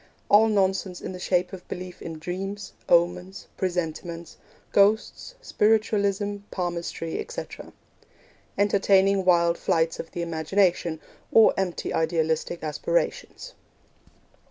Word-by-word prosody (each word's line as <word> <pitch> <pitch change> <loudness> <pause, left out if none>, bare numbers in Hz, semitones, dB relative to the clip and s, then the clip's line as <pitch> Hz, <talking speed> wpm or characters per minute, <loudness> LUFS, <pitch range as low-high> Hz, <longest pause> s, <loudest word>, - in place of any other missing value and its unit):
All 215 +2 +6
nonsense 190 -3 0
in - - -6
the 180 - -8
shape 180 +1 0
of 185 -1 -9
belief 180 0 -7
in 165 -1 -6
dreams, 195 +5 -5 0.2
omens, 180 +2 +1
presentiments, 170 -2 -4 0.4
ghosts, 215 - +2
spiritualism, 205 - +1
palmistry, 170 -2 -4
etc. 485 - -7 0.9
Entertaining 195 -1 +3
wild 170 -1 +3
flights 165 0 0
of 165 - -6
the 170 - -4
imagination, 170 0 0 0.3
or 225 - +6
empty 190 -3 -2
idealistic 160 0 -1
aspirations. - - -2
180 Hz, 105 wpm, -25 LUFS, 170-200 Hz, 0.9 s, All